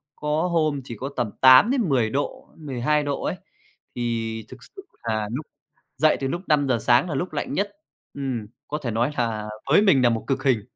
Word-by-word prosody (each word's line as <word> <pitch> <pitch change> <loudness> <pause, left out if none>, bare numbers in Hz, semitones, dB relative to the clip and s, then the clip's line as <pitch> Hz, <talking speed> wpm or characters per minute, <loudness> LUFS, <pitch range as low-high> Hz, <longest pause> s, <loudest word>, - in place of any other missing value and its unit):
Có 150 +3 -1
hôm 155 -4 +1
chỉ 120 -3 -8
có 135 +5 -4
tầm 120 -3 0
8 130 - +8
đến 240 - +1
10 125 -5 +2
độ, 140 +5 -3
12 150 0 0
độ 145 -1 -3
ấy, - - -1 0.6
thì 115 -2 -3
thực 130 - -10
sự 390 - -13 0.2
là 110 -2 -1
lúc 140 +6 -4 0.5
dậy 155 -1 +4
từ 135 - 0
lúc 170 +6 -3
5:00 140 -5 +2
sáng 120 +10 +3
là 150 - -2
lúc 175 +4 -3
lạnh 145 - -3
nhất, 200 +6 -1 0.4
ừm, 130 -6 -3 0.2
có 150 - -3
thể 120 - -2
nói 120 +5 0
là 110 -3 -1 0.2
với 165 - +7
mình 190 -11 +4
nà 120 - +5
một 115 -1 -1
cực 135 -1 -1
hình. 130 -6 +2
135 Hz, 205 wpm, -24 LUFS, 120-150 Hz, 0.6 s, 8